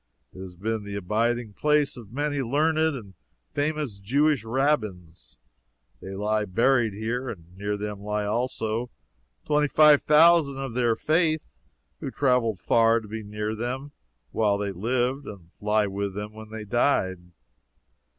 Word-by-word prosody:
It - - -12
has 95 -1 -8
been 110 +3 -3
the 100 0 -6
abiding 110 +3 -1
place 150 +3 +2
of 115 -5 -11
many 145 +2 -1
learned 155 +4 +1
and 105 -7 -9 0.4
famous 145 -7 -2
Jewish 140 +5 +2
rabbins. 110 - -2 0.6
They 95 0 -7
lie 105 +1 0
buried 115 +3 +2
here, 120 +4 -3
and 85 -3 -10
near 105 +1 -3
them 105 -1 -5
lie 105 +1 -2
also 115 +1 -2 0.6
twenty 150 0 +2
five 150 0 +6
thousand 155 -2 +5
of 135 -3 -4
their 120 -2 +2
faith 155 +1 +1 0.5
who - - -4
traveled 125 -6 +1
far 115 +4 +3
to 110 - -12
be 110 +1 -5
near 105 +1 -4
them 125 +5 -4 0.4
while 105 -2 +2
they 100 -1 -2
lived 125 +8 -1
and 90 -5 -10
lie 105 0 +2
with 100 0 -3
them 105 +1 -5
when 110 0 -11
they 110 -1 -7
died. 105 -5 +1
115 Hz, 150 wpm, -26 LUFS, 105-135 Hz, 0.6 s, five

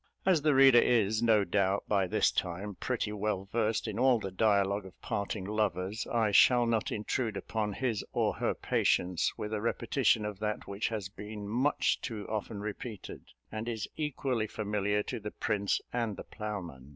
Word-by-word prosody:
As 185 -5 +4
the 150 -1 +3
reader 135 -2 +8
is, 110 -2 +2
no 110 -3 +4
doubt, 100 +1 +1
by 100 -3 +2
this - - +2
time 95 +4 -3
pretty 115 +1 -2
well 105 -2 -2
versed 110 -1 0
in 110 0 -3
all 130 -1 +5
the 95 -3 -5
dialogue 100 0 +2
of 95 -2 -14
parting 100 -1 -3
lovers, 105 -1 -1
I 115 -4 +2
shall 120 +4 +6
not 115 -2 0
intrude 110 0 -2
upon 105 -2 -2
his 120 -2 -1
or - - +1
her - - 0
patience 90 -1 +1
with 105 +1 -4
a 105 - -1
repetition 115 -1 +1
of 105 -2 -5
that 105 0 -3
which 100 +2 -2
has 105 -4 -3
been 105 0 -8
much 125 +7 +1
too 110 -4 -5
often 105 -1 -4
repeated, 105 0 -7 0.3
and 110 +2 -4
is 110 -3 -3
equally 130 -6 -1
familiar 105 -1 -1
to - - -4
the 105 0 -5
prince 105 -2 0
and 115 -4 -1
the - - -6
ploughman. 90 -11 -6
105 Hz, 175 wpm, -31 LUFS, 100-115 Hz, 0.3 s, reader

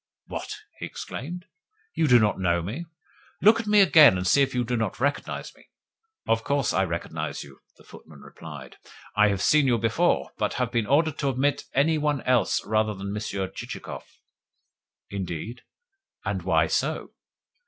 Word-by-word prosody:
"What?" - - -6 0.2
he - - -4
exclaimed. 175 +7 -7 0.5
"You 160 - +1
do 125 -2 +7
not 105 -4 +2
know 85 -2 +1
me? 130 - -5 0.5
Look 220 +3 +5
at 225 - -5
me 210 -1 +6
again, 155 - +7
and 90 - -3
see 140 +10 +4
if 135 - +1
you 125 - +1
do 120 +1 -2
not 110 -4 -2
recognise 140 +2 -2
me." - - -22 0.6
"Of 115 0 +1
course 140 -4 0
I 95 +1 +2
recognise 85 -1 -4
you," 70 -1 -15 0.2
the - - -19
footman 75 -3 -15
replied. 75 -5 -11 0.4
"I 105 0 +5
have 100 -1 -1
seen 150 -2 +4
you 120 -2 +3
before, 115 -1 +1
but - - -1
have 125 -2 -1
been 115 -3 0
ordered 155 +2 +2
to 140 - +1
admit 135 +2 0
any 155 +3 +3
one 150 -2 0
else 125 -6 +1
rather 110 0 +1
than 100 +1 -5
Monsieur 100 -2 -3
Chichikov." - - -8 1.1
"Indeed? 100 +4 -5 0.6
And - - -2
why - - +2
so?" - - -2
120 Hz, 170 wpm, -25 LUFS, 100-145 Hz, 1.1 s, do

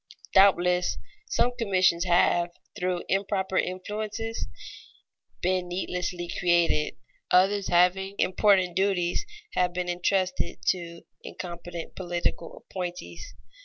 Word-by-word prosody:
Doubtless 180 -2 +4 0.3
some 245 - +2
commissions 185 -5 +3
have, 175 0 +3 0.3
through 180 -3 -1
improper 190 -1 -1
influences, 210 +5 -2 1.0
been 185 0 +1
needlessly 180 -1 -3
created; 170 -3 +2 0.3
others 195 +2 +3
having 180 +3 +3
important 185 -2 +3
duties 190 - +1 0.3
have 180 -1 +1
been 180 0 -2
intrusted 180 +1 0
to 170 -2 -2 0.2
incompetent 175 -1 -7
political 175 -2 -3
appointees. 180 - -6
180 Hz, 90 wpm, -27 LUFS, 175-190 Hz, 1.0 s, Doubtless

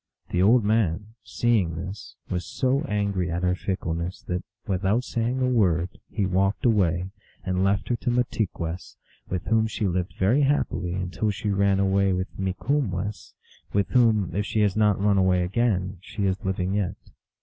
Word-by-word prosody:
The 90 - +1
old 115 +4 +5
man, 105 -1 0
seeing 105 -9 +1
this, 95 +5 -7
was 90 -1 -2
so 130 - 0
angry 100 -5 0
at 85 +1 -2
her 90 0 +3
fickleness 90 -2 -3
that, 90 0 -3 0.2
without 100 +4 +1
saying 120 +1 -1
a 130 - +2
word, 90 -8 +2 0.2
he 105 - -1
walked 95 +4 +1
away, 95 -5 +2 0.3
and 95 0 0
left 100 0 +1
her 120 - +2
to 125 - -2
Mahtigwess, 100 -8 -2 0.3
with 90 -2 -2
whom 110 0 +2
she 110 -1 -2
lived 90 -1 -1
very 110 +10 +3
happily 95 -11 0
until 95 +4 -2
she 105 0 -2
ran 100 0 +2
away 100 0 +2
with 95 +1 -4
Mikumwess; 100 0 -2 0.4
with 100 -1 +1
whom, 110 -8 +3
if 105 - +1
she 110 +1 0
has 100 -2 +2
not 105 -2 +3
run 100 0 +3
away 90 -1 +3
again, 95 -2 0
she 100 +1 -4
is 95 0 -1
living 95 0 -1
yet. 100 -3 -1
100 Hz, 170 wpm, -25 LUFS, 90-110 Hz, 0.4 s, old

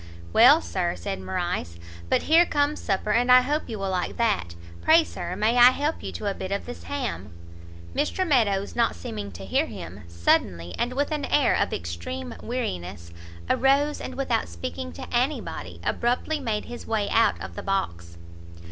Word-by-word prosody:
"Well, 270 +8 +7
Sir," 175 -2 -2
said 195 -1 -5
Morrice, 175 - -3 0.3
"but - - +2
here 330 +2 +6
comes 295 -2 0
supper, 200 +1 -1
and 245 +2 +3
I 255 0 +9
hope 295 +3 -2
you 220 - -4
will 195 -1 -2
like 180 -1 -2
that. 205 - 0 0.3
Pray 325 +1 +6
Sir, 180 - -6
may 215 +5 +1
I 245 +1 +10
help 290 +5 -2
you - - -5
to - - -6
a 200 - 0
bit 190 0 -6
of 200 - -2
this 245 - -9
ham?" 280 - -4 0.6
Mr 370 - 0
Meadows, 205 -9 +2
not 235 - +2
seeming 100 +3 -6
to 95 +3 -8
hear 95 - +1
him, - - -8
suddenly, 85 0 0
and 245 +1 0
with 285 +3 -1
an 300 -2 -1
air 290 -2 +3
of - - +1
extreme 85 0 -5
weariness, 90 - -4 0.4
arose, 280 - +2
and 255 - -6
without 260 - -1
speaking 85 0 -6
to 85 - -8
anybody, 260 +5 -2
abruptly 250 +6 0
made 220 -6 -2
his 240 - -9
way 215 -2 0
out 230 - +3
of - - -7
the 205 - -5
box. 85 - -3
210 Hz, 180 wpm, -25 LUFS, -, 0.6 s, I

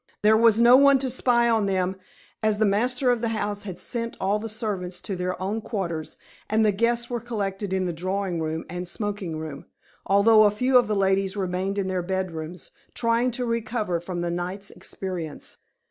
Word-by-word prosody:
There 215 +1 +6
was 225 0 +5
no 240 +2 +8
one 280 0 +6
to 260 -1 -1
spy 240 -1 +2
on 225 -3 +2
them, 190 -1 0 0.5
as 215 -1 +2
the 215 - +3
master 245 +5 +2
of 240 -2 0
the 235 - 0
house 210 -2 -2
had 185 -4 -6
sent 230 -1 -3
all 200 +2 +1
the 225 +1 -5
servants 205 -5 -3
to 195 - -4
their 180 0 -3
own 200 +4 -2
quarters, 170 -8 -4 0.3
and 220 +1 +3
the 210 - +4
guests 235 +3 +1
were 240 -1 -3
collected 205 -4 -3
in 190 -1 0
the 175 - -2
drawing 185 0 -2
room 160 0 -3
and 180 +1 -5
smoking 200 -4 -3
room, 155 -3 -7 0.4
although 215 +2 +6
a - - +6
few 250 +6 0
of 245 - 0
the 210 - 0
ladies 195 0 +1
remained 190 +1 -2
in 195 -2 0
their 185 -1 -1
bedrooms, 175 -2 -4 0.2
trying 235 +1 +2
to 245 +1 -2
recover 220 -6 -1
from 175 0 -5
the 175 0 -1
night's 180 +3 -4
experience. 175 -6 -6
200 Hz, 195 wpm, -25 LUFS, 185-230 Hz, 0.5 s, no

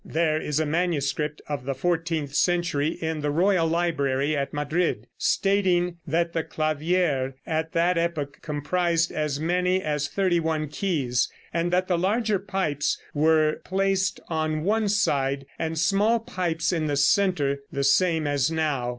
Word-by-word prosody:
There 155 -1 0
is 150 0 -1
a 155 - +1
manuscript 150 -2 -1
of 145 -4 -4
the 135 0 -2
fourteenth 165 -1 -1
century 175 -3 +1
in 160 -1 -2
the 145 - -1
Royal 175 +2 +2
Library 155 -4 0
at 140 -1 -2
Madrid, 150 - -1
stating 180 -3 +1
that 170 +3 0
the 165 - 0
clavier 155 -4 0
at 160 0 -2
that 170 +1 +2
epoch 155 -5 -2
comprised 165 +3 0
as 150 -2 -2
many 180 +3 +1
as 150 -4 -1
thirty 185 -1 +1
one 160 -2 -1
keys, 145 -8 0 0.2
and 170 +1 0
that 185 +1 +1
the 175 -2 +1
larger 210 +2 +1
pipes 190 -7 -1
were 155 0 +2
placed 195 0 0
on 155 -1 -1
one 215 +2 +1
side, 140 -9 +1
and 160 0 -2
small 205 +8 +3
pipes 175 -5 -2
in 160 -3 0
the 145 -1 0
center, 145 -3 +2
the 140 - -2
same 160 +2 +3
as 145 -1 +1
now. 150 -6 -1
160 Hz, 150 wpm, -25 LUFS, 145-180 Hz, 0.2 s, small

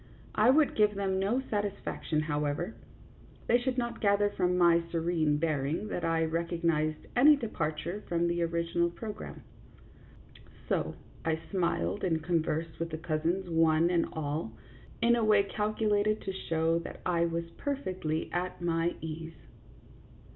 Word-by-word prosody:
I 215 +3 +4
would 295 +2 +5
give 210 -1 +3
them 195 -1 0
no 215 +7 +1
satisfaction, 200 -6 -2
however; 150 +5 -1 0.7
they 240 - +4
should 255 +1 -2
not 235 -2 -2
gather 205 0 +3
from 180 -2 +1
my 170 -1 +5
serene 165 -3 +1
bearing 155 +5 -1
that 175 - -3
I 165 0 +2
recognized 165 -2 0
any 290 +5 +7
departure 185 - -3
from 170 0 +1
the 170 0 0
original 170 0 +1
program; 210 +4 -7 1.2
so - - -1 0.3
I 160 -1 0
smiled 170 - 0
and 160 -4 0
con 170 -1 +2
versed 160 +1 -3
with 165 0 -2
the 155 - -4
cousins 170 +3 -1
one 165 0 +3
and 170 -2 +2
all 145 -6 -3 0.5
in 235 0 +5
a 235 - +1
way 210 -2 +5
cal 210 +2 -1
culated 215 0 +1
to 190 - -2
show 165 -2 0
that 170 - -8
I 170 -1 +2
was 170 0 -3
perfectly 185 - -2
at 180 +1 -2
my 170 0 0
ease. 160 +1 -6
170 Hz, 145 wpm, -30 LUFS, 160-205 Hz, 1.2 s, any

